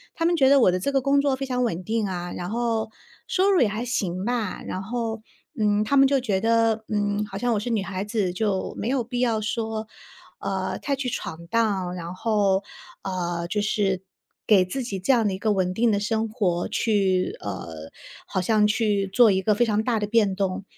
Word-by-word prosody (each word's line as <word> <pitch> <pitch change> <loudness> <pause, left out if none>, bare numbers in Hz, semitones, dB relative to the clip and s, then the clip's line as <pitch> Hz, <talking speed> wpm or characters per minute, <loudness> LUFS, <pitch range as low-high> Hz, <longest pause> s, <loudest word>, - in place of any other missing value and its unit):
他 330 - -1
们 345 +1 +3
觉 270 -4 +4
得 280 -1 +6
我 185 - +5
的 185 - -1
这 280 +10 -1
个 270 - +3
工 280 +1 +3
作 280 -2 +1
非 270 +1 -4
常 250 -1 -1
稳 185 -6 -2
定 220 0 -1
啊， 175 -1 -4
然 175 +1 -5
后， 230 -1 -1 0.4
收 390 +1 +2
入 380 - +4
也 240 - +5
还 215 +4 -3
行 190 -6 -2
吧。 230 -5 -2
然 185 - -4
后， 225 +1 -3 0.4
嗯， 210 0 +2
他 280 +6 0
们 270 0 +7
就 275 0 +2
觉 210 -7 0
得， 225 -1 +2
嗯， 205 -1 0
好 195 -1 -7
像 240 +2 0
我 210 - +1
是 230 - -4
女 225 -4 +1
孩 190 0 -4
子， 205 -4 -1
就 195 -1 -1
没 - - -3
有 265 -1 +1
必 245 +1 -4
要 230 -3 +2
说， 220 0 -3 0.5
呃， 190 -1 -2
太 280 -1 -1
去 265 -1 -3
闯 170 -6 -6
荡， 195 -4 0
然 175 0 -6
后， 200 -1 +1 0.4
呃， 175 -2 -3
就 210 +4 -1
是， 195 -3 0 0.4
给 195 -4 +5
自 260 +9 -4
己 200 -6 -4
这 190 - +2
样 230 -3 +2
的 195 - 0
一 190 - -5
个 215 +1 +1
稳 185 -2 0
定 230 +4 +2
的 200 - +1
生 225 +1 0
活， 190 -6 0
去， 195 -4 +1
呃， 80 -5 -6 0.4
好 - - -2
像 210 +2 +3
去 210 -2 +1
做 220 +2 +5
一 190 0 +1
个 210 +2 +2
非 240 - +3
常 215 -1 +1
大 235 -1 +1
的 210 - -1
变 210 -3 +2
动， 190 0 -2
210 Hz, 235 characters per minute, -24 LUFS, 190-235 Hz, 0.5 s, 们